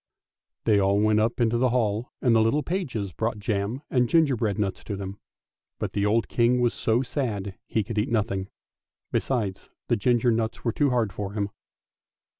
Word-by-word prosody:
They 105 -3 +4
all 100 +1 +3
went 110 0 +3
up 115 +3 0
into 120 0 +2
the 130 +1 +3
hall 115 -1 0
and 120 - +4
the 110 - +5
little 130 +7 +2
pages 125 - -3
brought 115 0 -1
jam 105 +5 -2
and 125 -2 +2
gingerbread 125 -11 +2
nuts 100 -3 -2
to 105 - -3
them; 95 0 -6 0.6
but - - -4
the 100 0 +1
old 110 +2 +2
King 120 +1 +2
was 120 -1 +2
so 115 +3 +1
sad 120 -7 -2
that 100 -1 -8
he 110 - 0
could 105 +1 -3
eat 110 +6 0
nothing, 100 -4 -1 0.6
besides 105 -8 -1 0.2
the 120 - +4
ginger 120 +2 +2
nuts 110 0 -1
were 115 - +2
too 145 -2 +2
hard 115 -6 +1
for 100 +1 -4
him. 100 -1 -2
110 Hz, 190 wpm, -26 LUFS, 100-120 Hz, 0.6 s, the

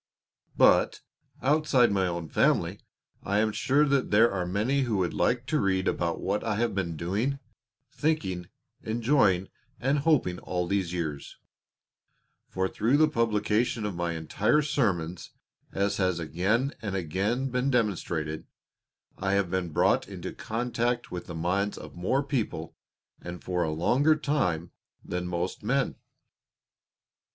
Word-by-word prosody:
But, - - +4 0.4
outside 140 -4 +3
my 95 -2 +2
own 85 -2 -3
family, - - +1 0.4
I 100 +1 -1
am 110 +1 +2
sure 140 +7 +2
that 140 -2 +1
there 110 +3 +5
are 90 -2 -2
many 110 +10 +1
who 120 -6 0
would 90 -3 0
like 120 0 +1
to 155 +2 0
read 95 -4 +1
about 85 -1 0
what 100 +2 -1
I 110 -2 -1
have 115 0 0
been 85 -5 -2
doing, 105 - -1 0.6
thinking, 95 - -1 0.3
enjoying, 110 -5 +2 0.3
and 135 +4 +1
hoping 140 - +2
all 90 -1 -2
these 95 -1 -1
years; 80 -5 -4 1.1
for 95 0 -1
through 115 +8 +1
the 155 +1 +5
publication 115 -2 +1
of 105 - -2
my 85 -1 -2
entire 105 - +1
Sermons, 90 - -1 0.4
as 100 +1 0
has 95 -3 +1
again 95 - 0
and 100 -4 -3
again 100 - -1
been 125 +2 0
demonstrated, 85 - -1 0.7
I 95 0 0
have 100 -3 +1
been 95 -2 -1
brought 75 - +2
into - - -7
contact 120 +1 -2
with 90 -1 -6
the 85 - -6
minds 95 +5 0
of - - -10
more 95 +11 0
people, 110 - -3 0.5
and 85 0 -8
for 90 -1 -1
a 80 - +1
longer 125 - +3
time, 90 - -1 0.3
than 90 0 -3
most 90 +1 -3
men. 135 +6 0
100 Hz, 145 wpm, -28 LUFS, 90-125 Hz, 1.1 s, there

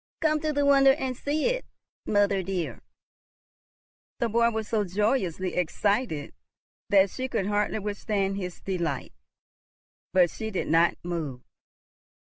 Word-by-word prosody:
Come 310 -1 +2
to 310 0 -1
the 285 -1 +1
window 275 -1 +6
and 265 -3 -3
see 290 +4 -1
it, - - +1 0.4
mother 205 -2 +3
dear." 185 -2 -3 1.4
The 235 - 0
boy 235 +1 +3
was 220 -2 -3
so 215 -2 +1
joyously 190 -2 0
excited 180 - -1 0.6
that 195 -1 +5
she 260 0 -3
could 195 - -1
hardly 210 +1 0
withstand 205 -1 -1
his 180 -3 -5
delight, 170 -8 -3 1.0
but 180 -2 +4
she 220 - -5
did 190 - -3
not 165 +2 +4
move. 160 -8 -4
205 Hz, 130 wpm, -27 LUFS, 180-255 Hz, 1.4 s, window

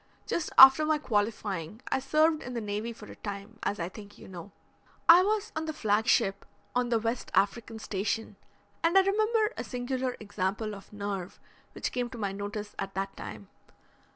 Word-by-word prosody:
"Just 335 - -2
after 265 +3 +10
my 310 0 +2
qualifying 210 - -2
I - - +2
served 310 +3 +2
in 250 0 -7
the - - -1
Navy 210 +2 -3
for 230 - -11
a - - -11
time, 205 +1 -7
as 205 - -2
I 170 - -2
think 205 +2 -12
you - - -13
know. 185 +1 -9 0.6
I 340 +2 +10
was 420 +2 0
on 315 0 -2
the 315 - -3
flag 215 -4 +1
ship 195 0 +2 0.3
on 245 -1 +1
the 235 - +3
West 230 +2 -2
African 220 +2 +1
Station, 215 +1 -3 0.5
and 335 +3 +4
I - - +9
remember 430 +3 +2
a - - -3
singular 255 0 -3
example 210 +1 -3
of 200 -1 -11
nerve 200 -3 -5 0.3
which - - -3
came 245 -1 -2
to 245 - -9
my 200 -3 -2
notice 205 +1 -5
at 195 0 -4
that 195 0 -3
time. 105 -2 -9
220 Hz, 185 wpm, -29 LUFS, 200-265 Hz, 0.6 s, after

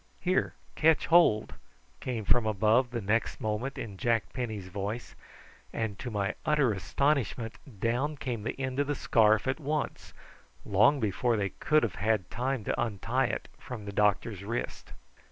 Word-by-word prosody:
"Here, 185 +1 0 0.2
ketch 160 0 +3
hold," 165 -11 +4 0.5
came 115 -5 -3
from 120 +1 +3
above 110 +4 +3
the 120 -1 -3
next 110 +4 0
moment 115 +4 -2
in 100 -4 -6
Jack 115 -4 0
Penny's 110 -7 -4
voice, 100 +5 -4 0.6
and 110 -3 -3
to 125 - -4
my 100 -3 -1
utter 150 -5 +3
astonishment 120 +1 0 0.3
down 125 +8 0
came 125 -5 -3
the 115 - -4
end 130 0 -2
of 145 - +1
the 145 - 0
scarf 110 -2 +3
at 130 +4 0
once, 150 0 -3 0.5
long 110 +9 +4
before 110 +2 +1
they 100 -2 0
could 155 +8 +2
have 110 -6 0
had 105 -4 +1
time 130 -1 -1
to - - -1
untie 115 +5 0
it - - -4
from 115 -5 -7
the 100 - -5
doctor's 105 -1 +1
wrist. 115 +4 -4
115 Hz, 160 wpm, -29 LUFS, 105-130 Hz, 0.6 s, hold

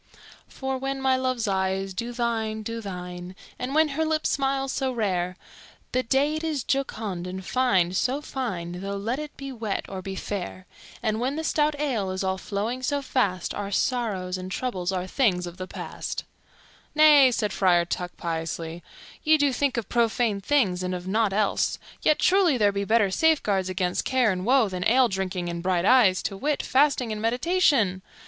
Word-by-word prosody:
"_For 265 -1 -3
when 270 0 -2
my 265 -1 +3
love's 255 -3 -1
eyes 190 0 -1
do 235 +5 -4
thine, 225 -2 -2
do 230 +1 -4
thine, 180 -2 -7 0.2
And 260 +3 -3
when 315 0 +4
her 300 +3 -1
lips 315 0 0
smile 270 0 0
so 265 0 -1
rare, 185 -6 -1 0.5
The 255 - +1
day 270 +5 +1
it 310 +1 -3
is 305 -6 -1
jocund 215 -10 -2
and 185 0 -6
fine, 190 -10 +2
so 255 +8 +1
fine, 180 -12 -4
Though 200 +1 -3
let 230 +7 -2
it 300 -1 -7
be 275 -1 -6
wet 220 -5 -3
or 190 -1 -6
be 190 +1 -6
fair 185 -1 -5 0.4
And 220 -1 0
when 260 +4 -1
the 320 - -3
stout 300 -2 +1
ale 240 -10 -1
is 185 +1 -3
all 190 0 -1
flowing 220 +7 -3
so 280 +2 -1
fast, 200 -10 0
Our 200 -1 -4
sorrows 200 -5 -1
and 185 +1 -7
troubles 195 -7 -2
are 185 -1 -2
things 185 -4 +1
of 175 0 -8
the 185 - -6
past_." - - -5 0.7
"Nay," 295 -3 +8
said 210 -5 -1
Friar 175 -3 +3
Tuck 175 +1 -4
piously, 165 0 -4 0.4
"ye 315 0 +5
do 285 -2 +2
think 270 0 0
of 230 - -2
profane 230 -3 +1
things 200 -7 +2
and 185 0 -2
of 180 0 -7
nought 215 +1 +2
else; 205 +1 +1 0.2
yet, 305 - +3
truly, 365 -7 +4
there 205 -3 +3
be 200 0 -2
better 215 -2 +3
safeguards 205 - +2
against 185 -1 -1
care 255 -4 +2
and 185 +2 -3
woe 260 -3 +5
than 185 -2 -4
ale 250 +1 +5
drinking 190 -2 -2
and 170 0 -4
bright 180 0 +1
eyes, 210 -6 +5
to 195 - -3
wit, 290 +8 -1
fasting 260 -3 +2
and 210 0 -4
meditation. 245 - +2
220 Hz, 185 wpm, -25 LUFS, 185-265 Hz, 0.7 s, Nay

